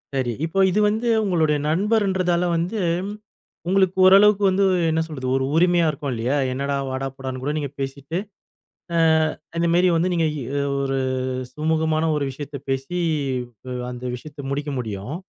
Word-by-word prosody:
சரி. 130 -3 0
இப்போ 165 +4 -2
இது 190 +3 +1
வந்து 220 +3 -1 0.2
உங்களுடைய 160 -6 +2
நண்பர்ன்றதால 185 -1 +1
வந்து, 180 +7 -1 0.9
உங்களுக்கு 190 0 +2
ஓரளவுக்கு 200 +2 +6
வந்து 190 +1 +2 0.3
என்ன 160 0 +1
சொல்றது 135 -5 -5
ஒரு 135 0 +1
உரிமையா 175 0 +4
இருக்கும் 145 -2 -4
இல்லையா? 120 +4 -1 0.2
என்னடா, 140 +2 -2
வாடா, 130 +1 -3
போடான்னு 130 -1 -6
கூட 145 - -1
நீங்க 145 -2 -2
பேசிட்டு, 140 +4 -4 0.8
அ, - - +3 0.6
இந்த 170 0 +2
மேரி 180 +1 +4
வந்து 175 +3 +1
நீங்க 165 -2 +2 0.6
ஒரு 135 0 -1 0.6
சுமூகமான 160 +1 +1
ஒரு 145 - 0
விஷயத்த 145 +1 -7
பேசி, 135 +7 -2 0.7
அ, - - -5 0.2
அந்த 125 0 -8
விஷயத்த 145 +3 -9
முடிக்க 145 +1 -2
முடியும். 110 +2 -5
155 Hz, 145 wpm, -22 LUFS, 135-180 Hz, 0.9 s, ஓரளவுக்கு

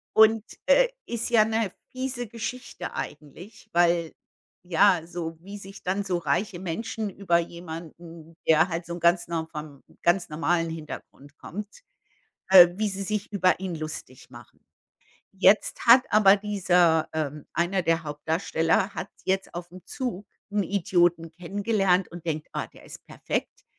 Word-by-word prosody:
Und, 220 0 +6 0.2
äh, - - +5 0.2
ist 235 -1 -3
ja 225 -3 +5
'ne 220 -3 -1 0.2
fiese 255 -2 -4
Geschichte 235 +3 -6
eigentlich, 180 +9 -8
weil, 170 -1 +2 0.5
ja, 180 +1 +4
so 165 -1 -6
wie 200 +3 -9
sich 195 0 -12
dann 190 +3 -1
so 185 -3 -1
reiche 175 +4 -1
Menschen 215 +5 -4
über 190 -3 +1
jemanden, 165 -1 -9
der 160 +1 +5
halt 170 0 -3
so 170 +1 -6
ganz 175 +1 +3
nor 165 -1 -3
vom 150 -3 -9 0.2
ganz 175 +1 +2
normalen 165 +2 0
Hintergrund 150 -2 -9
kommt 210 - -8 0.7
äh, 185 -2 +10
wie 210 +1 0
sie 195 0 -4
sich 210 +1 -3
über 185 -3 +2
ihn 190 -2 -4
lustig 155 -5 -7
machen. - - -15 0.7
Jetzt 195 +4 +3
hat 240 +2 +9
aber 205 -2 +6
dieser 180 -6 +2
ähm, 150 -2 -3
einer 180 +3 0
der 165 -1 +1
Hauptdarsteller 160 +4 0
hat - - -5 0.2
jetzt 190 0 -1
aufm 175 +1 -8
Zug 225 -7 -5 0.2
'n 205 0 +1
Idioten 175 -3 +1
kennengelernt 195 +2 0
und 175 -1 -10
denkt: 155 -2 -3
„Ah, - - -3
der - - -18
ist - - -12
perfekt,“ - - -4
180 Hz, 145 wpm, -26 LUFS, 165-205 Hz, 0.7 s, äh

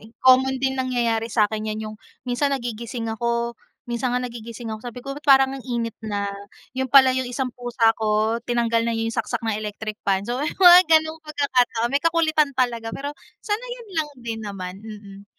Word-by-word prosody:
Ek 220 - -15
common 260 +1 +5
din 265 0 -1
nangyayari 235 -3 0
sa 220 -1 +3
akin 215 +1 -3
'yan, 215 0 -3
'yung 215 0 -7 0.3
minsan 250 +3 0
nagigising 235 -1 -5
ako 235 +1 -1 0.3
minsan 240 +1 -2
nga 250 - +1
nagigising 235 -1 -7
ako 220 -1 -5
sabi 245 0 -7
ko, 275 +2 -6
"Ba't 290 - -10
parang 270 -2 +5
ang 270 - -8
init 235 -3 -3
na?" 205 -2 -2 0.5
'yun 260 0 -2
pala 265 -1 +7
'yung 260 -1 -1
isang 255 0 -3
pusa 240 -2 +2
ko, 220 +1 +1
tinanggal 235 -1 +1
na 235 - -1
'yung 225 0 -2
saksak 235 +1 -2
na 220 - 0
electric 215 0 -5
fan. 195 0 +1
So, 245 +2 -2
'yong 300 - -3
mga 360 -1 +10
ganong 315 0 +3
pagkakataon 260 -6 0
may 280 - +2
kakulitan 320 -3 +2
talaga, 235 -3 0
pero 285 +5 -5 0.3
sanayan 475 +2 -4
lang 315 -2 0
din 230 -2 -5
naman, 190 -3 -6
mm 205 -2 -11
240 Hz, 190 wpm, -23 LUFS, 225-265 Hz, 0.5 s, mga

